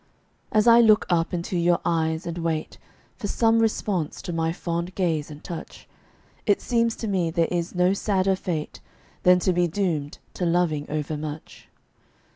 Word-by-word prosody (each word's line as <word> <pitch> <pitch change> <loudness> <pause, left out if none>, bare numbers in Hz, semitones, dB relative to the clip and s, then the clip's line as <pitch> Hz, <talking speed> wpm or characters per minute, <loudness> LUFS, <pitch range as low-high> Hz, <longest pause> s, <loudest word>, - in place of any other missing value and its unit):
As 215 -1 +3
I 235 0 +8
look 220 -1 +5
up 165 -1 +1
into 175 +1 -3
your 175 0 +3
eyes 160 -1 0
and 170 0 -4
wait 165 -2 -3 0.4
For 205 - -4
some 225 +2 +3
response 205 -7 -1
to 175 - -4
my 165 0 0
fond 170 +1 -4
gaze 160 -6 0
and 150 0 -11
touch, 170 -2 -8 0.6
It 205 - +4
seems 230 -2 +1
to 225 - -5
me 185 -5 0
there 165 0 +1
is 175 0 -2
no 180 +1 +3
sadder 195 -1 +1
fate 165 -5 -4 0.4
Than 180 0 +6
to 185 - +2
be 175 0 +2
doomed 160 -5 -2 0.2
to - - -4
loving 170 -4 +1
overmuch. 150 0 -5
175 Hz, 165 wpm, -24 LUFS, 160-195 Hz, 0.6 s, I